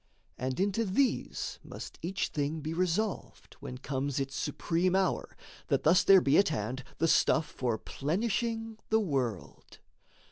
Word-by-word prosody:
And 130 +1 -3
into 200 +3 +1
these 235 +6 0
must - - -9
each 185 +3 -2
thing 150 +2 -2
be 155 +2 -3
resolved, 185 +4 -2
When 125 - -7
comes 135 +1 -2
its 135 0 -3
supreme 175 +2 0
hour, 190 -1 0 0.3
that - - +1
thus 170 +4 +5
there 195 -1 +7
be 140 0 +4
At 200 - +4
hand 135 -3 -3
the 165 - +2
stuff 155 -1 +4
for 120 -6 -2
plenishing 225 - -2
the 220 - +4
world. 130 - -3
165 Hz, 145 wpm, -30 LUFS, 140-195 Hz, 0.3 s, there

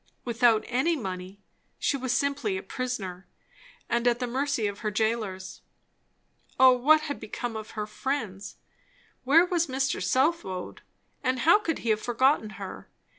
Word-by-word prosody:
Without 235 -2 +3
any 265 +7 +1
money, 190 -5 -6 0.4
she - - 0
was 260 -2 -2
simply 280 -9 0
a 190 - -6
prisoner, 195 -6 -5 0.6
and 235 +1 +1
at 240 -1 +3
the 250 - -2
mercy 265 -1 -1
of 200 -1 -3
her 215 - -2
jailers. 210 -3 -2 1.0
O 260 0 +9
what 290 +5 +4
had 290 -2 -4
become 225 +2 -5
of 220 0 -8
her 210 - -1
friends! 215 -3 -4 0.7
Where 320 +6 +6
was 345 -2 0
Mr. 270 0 -1
Southwode, 260 - 0 0.4
and 255 -2 0
how 340 +6 +6
could 330 -7 -2
he - - 0
have 215 0 +1
forgotten 245 0 +2
her? 195 -2 -8
245 Hz, 150 wpm, -27 LUFS, 210-275 Hz, 1.0 s, O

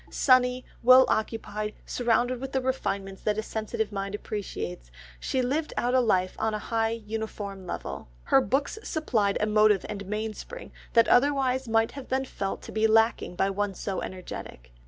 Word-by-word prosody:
Sunny, 255 -1 +3 0.2
well 255 +2 +8
occupied, 215 -1 -2
surrounded 245 +1 +1
with 270 0 -6
the 265 - +2
refinements 200 -7 -2
that 210 0 0
a 220 - -1
sensitive 220 -1 -3
mind 195 0 -3
appreciates, 90 - -5 0.3
she 260 - -1
lived 295 +5 -1
out 245 +1 +1
a 260 - +5
life 185 -6 +1
on 220 -1 0
a 210 - -6
high 225 0 +2
uniform 215 -3 -5
level. - - -5 0.2
Her 135 - +4
books 275 - -1
supplied 225 - 0
a - - +2
motive 210 -2 +4
and 200 -2 -6
mainspring 215 - -5 0.2
that 230 0 +5
otherwise 260 -1 +3
might 225 0 +2
have 275 -2 -9
been 265 +1 0
felt 195 -6 -4
to - - -9
be 220 0 +2
lacking 225 -4 +2
by 195 +2 +1
one 200 0 -2
so 195 0 -3
energetic. 120 - -8
220 Hz, 170 wpm, -27 LUFS, 200-250 Hz, 0.3 s, well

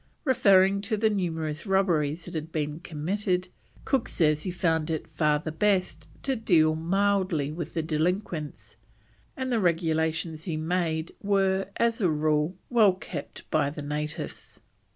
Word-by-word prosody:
Referring 200 -7 +4
to 210 +2 -1
the 220 +1 +2
numerous 160 -4 -2
robberies 170 -5 +1
that 175 - -9
had 160 0 -4
been 150 -1 -2
committed, 180 +3 -2 0.4
Cook 265 -4 +1
says 155 -3 +2
he 185 - -3
found 165 -3 0
it 160 -2 -2
far 150 -2 +1
the 155 +1 -5
best 190 +3 0 0.2
to 270 -1 0
deal 170 -9 +3
mildly 185 -3 +1
with 165 0 -6
the 165 - 0
delinquents, 160 0 -2 0.6
and 260 -1 -2
the 235 - +2
regulations 160 -2 0
he 165 -4 -2
made 160 0 -1
were, 195 -1 +1
as 230 0 +1
a 185 - +3
rule, 155 +2 +1
well 220 -6 +5
kept - - -8
by 140 - +2
the 150 0 -7
natives. 150 +1 -5
170 Hz, 150 wpm, -27 LUFS, 155-195 Hz, 0.6 s, well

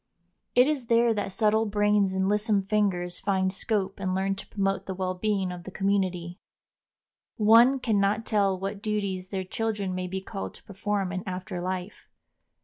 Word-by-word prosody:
It 250 +1 +7
is 280 -5 -1
there 235 0 +4
that 205 -2 -2
subtle 220 +2 +2
brains 205 -1 +2
and 190 0 +1
lissome 210 0 +2
fingers 190 -4 0
find 190 -2 0
scope 195 -1 -1
and 185 -1 -1
learn 195 +1 0
to 195 - -9
promote 195 -1 -1
the 190 - -3
well 185 0 -1
being 195 -1 -1
of 175 -1 -7
the 190 - -7
community. 185 -2 -1 1.0
One 230 +5 +6
can 220 -5 +1
not 205 +3 +1
tell 200 -3 +2
what 195 +1 -4
duties 200 -4 -2
their 190 -2 -2
children 205 -1 -2
may 185 0 -3
be 190 +1 -3
called 95 - -6
to - - -15
perform 200 -2 -2
in 185 -1 -3
after 185 0 -4
life. 185 +2 -5
195 Hz, 175 wpm, -27 LUFS, 185-210 Hz, 1.0 s, It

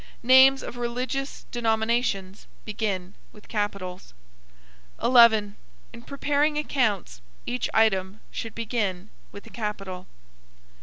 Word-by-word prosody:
Names 260 +2 +6
of 245 - -7
religious 250 +3 -4
denominations 220 -4 -1 0.2
begin 200 -4 -3 0.2
with 210 - -17
capitals. 195 - -4 0.8
11. 220 -4 +5 0.4
In 235 - -10
preparing 290 +3 0
accounts, 215 - -1 0.2
each 250 +1 -2
item 200 -2 +1
should 225 -2 -6
begin 215 -4 -3 0.2
with 200 - -11
a 225 - -14
capital. 195 -5 -5
220 Hz, 100 wpm, -25 LUFS, 200-245 Hz, 0.8 s, Names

